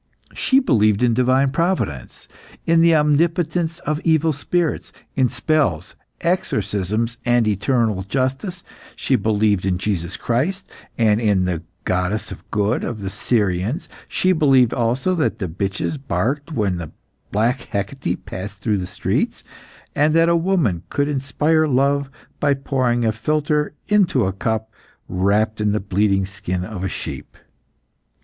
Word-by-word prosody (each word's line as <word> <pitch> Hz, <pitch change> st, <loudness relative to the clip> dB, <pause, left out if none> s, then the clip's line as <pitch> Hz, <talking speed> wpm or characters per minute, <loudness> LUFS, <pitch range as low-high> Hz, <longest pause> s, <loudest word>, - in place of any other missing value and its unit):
She 265 Hz, -, +3 dB
believed 110 Hz, -, +2 dB
in 120 Hz, -1 st, +4 dB
divine 130 Hz, +3 st, +3 dB
providence, 165 Hz, -, -2 dB, 0.4 s
in 165 Hz, 0 st, +4 dB
the 165 Hz, -1 st, +5 dB
omnipotence 165 Hz, +2 st, +1 dB
of 150 Hz, +1 st, -2 dB
evil 160 Hz, -1 st, +3 dB
spirits, 165 Hz, +3 st, -1 dB, 0.2 s
in 130 Hz, -2 st, +3 dB
spells, 115 Hz, -, 0 dB, 0.3 s
exorcisms, 110 Hz, -, -1 dB
and 120 Hz, -2 st, +3 dB
eternal 110 Hz, 0 st, +1 dB
justice; 135 Hz, -, -2 dB, 0.3 s
she 135 Hz, -, +1 dB
believed 105 Hz, -4 st, +1 dB
in 95 Hz, -1 st, 0 dB
Jesus 90 Hz, -3 st, -2 dB
Christ, 160 Hz, +12 st, -1 dB, 0.3 s
and 110 Hz, -1 st, +3 dB
in 100 Hz, -5 st, +2 dB
the 90 Hz, -3 st, -2 dB, 0.2 s
goddess 90 Hz, +4 st, -1 dB
of -, -, -11 dB
good 105 Hz, +2 st, 0 dB
of 115 Hz, -3 st, -4 dB
the 95 Hz, -1 st, -4 dB
Syrians; 105 Hz, -, 0 dB, 0.2 s
she 185 Hz, -, +2 dB
believed 135 Hz, -8 st, +4 dB
also 125 Hz, +8 st, 0 dB
that 165 Hz, -4 st, 0 dB
bitches 95 Hz, -, -3 dB
barked 140 Hz, +3 st, -2 dB
when 95 Hz, -, -2 dB, 0.4 s
black 115 Hz, +5 st, +1 dB
Hecate 100 Hz, -1 st, -3 dB
passed 100 Hz, +2 st, -7 dB
through 105 Hz, -3 st, 0 dB
the 90 Hz, -, -4 dB
streets, -, -, -1 dB, 0.5 s
and 150 Hz, +2 st, +3 dB
that 165 Hz, 0 st, +5 dB
a 170 Hz, -, +4 dB
woman 165 Hz, -, +1 dB
could 145 Hz, 0 st, 0 dB
inspire 150 Hz, +3 st, +1 dB
love 140 Hz, +1 st, +1 dB, 0.3 s
by 145 Hz, -1 st, +2 dB
pouring 130 Hz, -3 st, 0 dB
a 110 Hz, -, +3 dB
philtre 150 Hz, +6 st, 0 dB
into 200 Hz, -, +3 dB
a 95 Hz, -, -1 dB
cup 110 Hz, +2 st, -2 dB, 0.3 s
wrapped 105 Hz, +4 st, +1 dB
in 105 Hz, -1 st, +2 dB
the 105 Hz, -, +1 dB
bleeding 100 Hz, 0 st, +1 dB
skin 90 Hz, -2 st, -4 dB
of 100 Hz, -3 st, -6 dB
a 95 Hz, -, -1 dB
sheep. -, -, -7 dB
120 Hz, 140 wpm, -21 LUFS, 100-150 Hz, 0.5 s, the